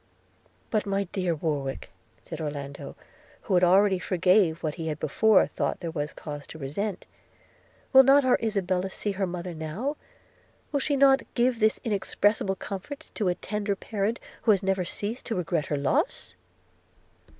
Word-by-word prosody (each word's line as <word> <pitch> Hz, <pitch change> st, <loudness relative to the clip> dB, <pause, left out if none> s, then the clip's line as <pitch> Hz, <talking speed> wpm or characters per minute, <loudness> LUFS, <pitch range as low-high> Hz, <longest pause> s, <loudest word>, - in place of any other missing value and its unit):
'But, 215 Hz, -3 st, 0 dB
my 200 Hz, 0 st, +1 dB
dear 180 Hz, -4 st, 0 dB
Warwick,' 145 Hz, -4 st, -3 dB, 0.3 s
said 165 Hz, -1 st, -7 dB
Orlando, 145 Hz, -2 st, -6 dB, 0.5 s
who 185 Hz, -5 st, +2 dB
already 190 Hz, +2 st, +4 dB
forgave 180 Hz, -2 st, +2 dB
what 155 Hz, -2 st, -1 dB
he 165 Hz, -1 st, -5 dB
had 155 Hz, -2 st, -2 dB
before 210 Hz, +7 st, +4 dB
thought -, -, -2 dB
there 170 Hz, -2 st, -4 dB
was 150 Hz, -2 st, -3 dB
cause 145 Hz, -2 st, -8 dB
to -, -, -10 dB
resent, 175 Hz, +8 st, -4 dB, 0.9 s
'will 265 Hz, -, +11 dB
not 275 Hz, +1 st, +5 dB
our 255 Hz, -, +4 dB
Isabella 190 Hz, -4 st, 0 dB
see 205 Hz, +2 st, -3 dB
her 195 Hz, -1 st, -1 dB
mother 175 Hz, 0 st, -5 dB
now? 170 Hz, -, -4 dB, 0.4 s
– -, -, -35 dB
Will 285 Hz, -2 st, 0 dB, 0.2 s
not 270 Hz, 0 st, +6 dB
she -, -, -17 dB
give 245 Hz, -1 st, +2 dB
this 215 Hz, -1 st, +3 dB
inexpressible 205 Hz, -1 st, +1 dB
comfort 200 Hz, +9 st, -7 dB
to 210 Hz, -, -1 dB
a 180 Hz, -, 0 dB
tender 205 Hz, +1 st, -2 dB
parent, 210 Hz, +2 st, -2 dB, 0.2 s
who 225 Hz, -, -1 dB
had 200 Hz, -2 st, +4 dB
never 190 Hz, -1 st, 0 dB
ceased 210 Hz, +7 st, -4 dB
to 225 Hz, -, -2 dB
regret 170 Hz, -3 st, -1 dB
her 145 Hz, -, -1 dB
loss?' 140 Hz, -8 st, 0 dB
190 Hz, 160 wpm, -27 LUFS, 165-215 Hz, 0.9 s, will